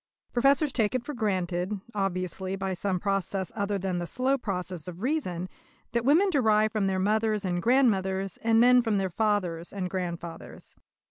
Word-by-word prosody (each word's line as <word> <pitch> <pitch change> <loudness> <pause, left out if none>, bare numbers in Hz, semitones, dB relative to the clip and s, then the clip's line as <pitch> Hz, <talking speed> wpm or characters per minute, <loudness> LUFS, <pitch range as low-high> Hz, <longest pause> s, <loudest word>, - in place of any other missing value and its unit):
Professors 275 +4 +3
take 225 0 +1
it 255 - -1
for 295 - -5
granted, 190 -4 -1
obviously 190 -1 -2
by 190 0 -2
some 185 0 -1
process 195 -1 -1
other 205 -1 -1
than 185 -2 -2
the 175 - -4
slow 260 +6 +1
process 185 - -4
of 180 +3 -8
reason, 185 - -1 0.4
that 235 -1 0
women 335 +10 +4
derive 215 -7 +3
from 210 -3 0
their 190 -1 0
mothers 215 +1 +1
and 175 -1 -1
grandmothers, 195 -6 +2
and 225 0 +2
men 250 +1 +6
from 225 -3 0
their 190 -2 -1
fathers 180 -5 -1
and 185 -3 -4
grandfathers. 170 -3 -6
195 Hz, 170 wpm, -27 LUFS, 185-230 Hz, 0.4 s, men